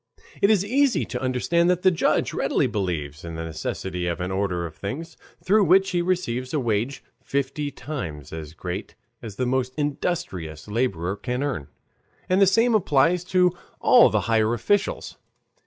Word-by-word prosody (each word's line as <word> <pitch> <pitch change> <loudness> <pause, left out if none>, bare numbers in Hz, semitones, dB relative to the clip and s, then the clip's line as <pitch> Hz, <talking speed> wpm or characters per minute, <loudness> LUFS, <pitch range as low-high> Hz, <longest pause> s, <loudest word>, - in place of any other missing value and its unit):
It 200 - +5
is 205 -3 +3
easy 270 +4 +2
to - - -5
understand 135 +7 +1
that 180 0 +1
the 185 - +6
judge 170 - +1
readily - - +1
believes 80 -7 -3
in 85 -1 -6
the 80 - -4
necessity 90 +2 -4
of 85 0 -2
an 90 +1 -3
order 95 -3 -1
of 80 -2 -8
things 155 - -6 0.3
through 205 +1 +4
which 190 +3 +4
he 175 -2 +1
receives 145 -8 -1
a - - +2
wage 120 +2 -1 0.2
fifty 140 +1 -2
times 80 - -6
as 80 -1 -7
great 90 +4 -6 0.3
as 110 -4 -8
the 125 - -1
most 130 0 -1
industrious 140 - -3
laborer 100 -5 -1
can 125 +5 -3
earn, 130 - -3 0.6
and 185 +2 +2
the 195 - +7
same 230 +5 +3
applies 170 -3 +3
to 180 -1 +3 0.2
all - - +7
the - - +1
higher 115 0 +2
officials. 205 - -1
130 Hz, 170 wpm, -24 LUFS, -, 0.6 s, the